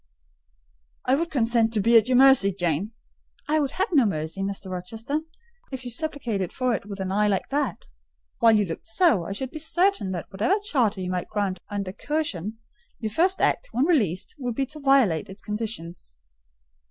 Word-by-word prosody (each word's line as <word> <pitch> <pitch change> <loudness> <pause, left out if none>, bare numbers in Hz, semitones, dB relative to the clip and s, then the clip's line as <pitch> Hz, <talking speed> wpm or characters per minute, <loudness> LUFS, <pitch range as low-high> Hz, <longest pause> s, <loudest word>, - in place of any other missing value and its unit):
"I 255 - +2
would 335 +5 +1
consent 230 -4 +2
to 220 - +2
be 230 +4 +3
at 225 0 +6
your 255 -1 +3
mercy, 265 -7 +6
Jane." 180 +3 -2 0.5
"I 310 +1 +2
would 285 -2 0
have 385 +4 0
no 290 -6 +5
mercy, 160 +1 -3
Mr. 195 -1 -4
Rochester, 225 +11 -3 0.5
if 260 -1 -6
you 245 - -5
supplicated 240 - -2
for 255 -1 0
it 200 -1 -4
with 200 -1 -7
an 190 0 -3
eye 210 +2 +2
like 195 -2 0
that. 275 - -2 0.5
While 230 -1 +6
you 210 -1 +3
looked 165 -3 -7
so, 220 - +3
I - - -5
should 255 +6 -3
be 310 - -6
certain 345 - +1
that 175 - -6
whatever 215 - +1
charter 235 - +1
you 180 0 -3
might 180 -1 -3
grant 200 -3 -1
under 200 -2 -4
coercion, 225 - -3 0.4
your 220 -2 -4
first 365 - +2
act, - - +1
when 260 - +2
released, 205 - +1
would 245 -3 -3
be 275 - 0
to 300 +3 -8
violate 270 - +3
its 195 +1 -11
conditions." 195 - -5
225 Hz, 190 wpm, -25 LUFS, 195-275 Hz, 0.5 s, at